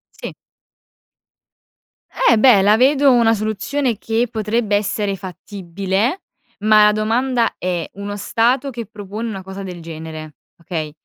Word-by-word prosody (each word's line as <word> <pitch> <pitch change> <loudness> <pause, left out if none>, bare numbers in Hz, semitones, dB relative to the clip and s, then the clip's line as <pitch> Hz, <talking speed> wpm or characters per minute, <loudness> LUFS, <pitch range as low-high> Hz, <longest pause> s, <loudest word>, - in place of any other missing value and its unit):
Sì. - - -7 1.9
Eh 230 - +6
beh, 225 -4 +6
la 205 +2 +5
vedo 275 +3 +4
una 235 -2 +4
soluzione 220 +4 -2
che 225 +2 0
potrebbe 220 -1 -1
essere 205 -1 -1
fattibile, 195 - -3 0.4
ma 215 0 +5
la 210 - +5
domanda 230 +3 0
è: 175 -3 -3
uno 200 +1 -6
stato 245 +6 0
che 235 -4 -7
propone 210 +2 -6
una 195 -3 -6
cosa 190 +1 -8
del 180 -2 -7
genere, 160 -2 -8 0.2
okay, 160 -2 -5
210 Hz, 130 wpm, -19 LUFS, 190-235 Hz, 1.9 s, Eh